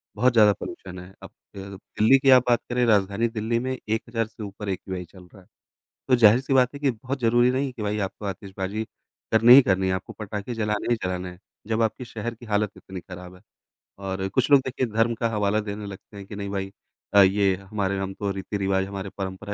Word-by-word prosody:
बहुत 125 Hz, +4 st, +3 dB
ज़्यादा 105 Hz, -3 st, +6 dB
पॉल्यूशन 90 Hz, -1 st, -8 dB
है। 90 Hz, +1 st, -12 dB
अब -, -, -9 dB, 0.3 s
के 95 Hz, -, -7 dB
अ, 100 Hz, -, -9 dB
दिल्ली 110 Hz, +6 st, +3 dB
की 135 Hz, 0 st, +2 dB
आप 130 Hz, -1 st, +7 dB
बात 120 Hz, -, +4 dB
करें 125 Hz, 0 st, +1 dB
राजधानी 100 Hz, +1 st, +2 dB
दिल्ली 115 Hz, +1 st, -1 dB
में 130 Hz, +1 st, -3 dB
1000 115 Hz, +1 st, -1 dB
से 110 Hz, -1 st, -10 dB
ऊपर 100 Hz, 0 st, -7 dB
एक्यूआई 95 Hz, -1 st, -4 dB
चल 90 Hz, +1 st, -16 dB
रहा 95 Hz, -, -15 dB
है। 90 Hz, -, -24 dB, 0.6 s
तो 130 Hz, -, +5 dB
ज़ाहिर-सी 120 Hz, +4 st, +4 dB
बात 125 Hz, +1 st, +3 dB
है 140 Hz, -, -8 dB
कि 140 Hz, -, +2 dB
बहुत 130 Hz, +4 st, -5 dB
ज़रूरी 120 Hz, +1 st, +4 dB
नहीं 130 Hz, +1 st, -1 dB
कि 120 Hz, -, -8 dB
भाई 105 Hz, 0 st, -1 dB
आपको 105 Hz, -, -14 dB
आतिशबाजी 100 Hz, +2 st, -4 dB, 0.5 s
करनी 115 Hz, +3 st, +8 dB
ही 140 Hz, -, +10 dB
करनी 95 Hz, -3 st, +1 dB
है, 95 Hz, -, +1 dB
आपको 95 Hz, 0 st, -6 dB
पटाखे 105 Hz, +2 st, -6 dB
जलाने 105 Hz, -2 st, -2 dB
ही -, -, +2 dB
जलाने 90 Hz, 0 st, -3 dB
हैं, 90 Hz, -, -13 dB, 0.3 s
जब 110 Hz, +1 st, 0 dB
आपके 115 Hz, +3 st, -1 dB
शहर 115 Hz, 0 st, -5 dB
की 120 Hz, +1 st, -14 dB
हालत 105 Hz, -1 st, 0 dB
इतनी 95 Hz, -1 st, -9 dB
खराब 90 Hz, 0 st, -11 dB
है। -, -, -20 dB, 0.6 s
और 95 Hz, 0 st, -3 dB
कुछ 130 Hz, +7 st, 0 dB
लोग 140 Hz, -, +8 dB
देखिए 130 Hz, 0 st, -1 dB
धर्म 115 Hz, +1 st, +3 dB
का 115 Hz, -, +1 dB
हवाला 105 Hz, -1 st, +1 dB
देने 105 Hz, 0 st, -5 dB
लगते 100 Hz, +1 st, -11 dB
हैं 100 Hz, -, -9 dB
कि 100 Hz, -, -9 dB
नहीं 100 Hz, -1 st, -5 dB
भाई 95 Hz, -1 st, -4 dB, 0.4 s
अ, 100 Hz, -, +8 dB
ये 95 Hz, 0 st, +4 dB
हमारे 100 Hz, 0 st, -3 dB
हम 95 Hz, 0 st, -3 dB
तो 100 Hz, +1 st, -3 dB
रीति-रिवाज़, 95 Hz, 0 st, -1 dB
हमारे 100 Hz, 0 st, -6 dB
परंपरा 95 Hz, +1 st, -5 dB
105 Hz, 225 wpm, -24 LUFS, 95-115 Hz, 0.6 s, ही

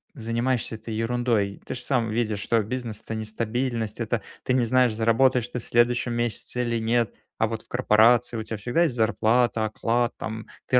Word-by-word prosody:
занимаешься 115 Hz, 0 st, -1 dB
этой 110 Hz, 0 st, -7 dB
ерундой? 115 Hz, -3 st, 0 dB
Ты -, -, -4 dB
ж -, -, -5 dB
сам 125 Hz, -2 st, 0 dB
видишь, 110 Hz, -2 st, -1 dB
что 115 Hz, +2 st, +1 dB
бизнес- 115 Hz, -1 st, -5 dB
это -, -, -5 dB
нестабильность, 110 Hz, +1 st, -2 dB
это, 115 Hz, -1 st, -1 dB, 0.2 s
ты 125 Hz, -, 0 dB
не 125 Hz, -2 st, +3 dB
знаешь, 125 Hz, 0 st, +3 dB
заработаешь 115 Hz, +2 st, +3 dB
ты 125 Hz, -, -4 dB
в -, -, -6 dB
следующем 120 Hz, 0 st, +2 dB
месяце 120 Hz, +1 st, -2 dB
или 120 Hz, -1 st, -1 dB
нет. 115 Hz, -1 st, +1 dB, 0.2 s
А 110 Hz, -, +2 dB
вот 110 Hz, 0 st, -5 dB
в -, -, -30 dB
корпорации 120 Hz, 0 st, +3 dB
у 110 Hz, -, -3 dB
тебя 110 Hz, -, -5 dB
всегда 125 Hz, +11 st, +1 dB
есть 150 Hz, -8 st, 0 dB
зарплата, 115 Hz, 0 st, +2 dB
оклад 115 Hz, +2 st, 0 dB
там, 110 Hz, 0 st, -6 dB, 0.2 s
ты 125 Hz, -, +5 dB
115 Hz, 190 wpm, -25 LUFS, 110-120 Hz, 0.2 s, ты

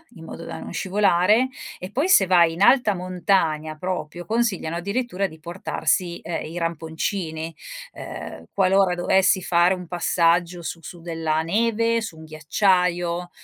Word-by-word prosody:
in 165 Hz, -, -12 dB
modo 165 Hz, -, -8 dB
da -, -, -6 dB
non -, -, -8 dB
scivolare. 205 Hz, +5 st, +2 dB, 0.3 s
E 185 Hz, +2 st, -8 dB
poi 290 Hz, -, 0 dB
se 200 Hz, -, +6 dB
vai 175 Hz, -3 st, +4 dB
in 170 Hz, -, -7 dB
alta 240 Hz, -2 st, +5 dB
montagna 175 Hz, -4 st, 0 dB
proprio, 175 Hz, -1 st, -4 dB
consigliano 215 Hz, -8 st, -1 dB
addirittura 200 Hz, +1 st, -2 dB
di 160 Hz, -3 st, -14 dB
portarsi, 175 Hz, +1 st, -1 dB
uhm, 165 Hz, 0 st, -4 dB
i 165 Hz, +3 st, -7 dB
ramponcini, 165 Hz, 0 st, -3 dB, 0.4 s
uhm, -, -, -8 dB
qualora 190 Hz, -1 st, +3 dB
dovessi 185 Hz, +1 st, +3 dB
fare 175 Hz, +1 st, +3 dB
un 180 Hz, -2 st, -9 dB
passaggio 175 Hz, 0 st, +1 dB
su 165 Hz, -, -5 dB
su 175 Hz, +1 st, -10 dB
della 160 Hz, -2 st, -1 dB
neve, 230 Hz, +5 st, +1 dB
su 220 Hz, -7 st, -7 dB
un 160 Hz, -, -11 dB
ghiacciaio, 175 Hz, +2 st, 0 dB
180 Hz, 145 wpm, -23 LUFS, 165-195 Hz, 0.4 s, se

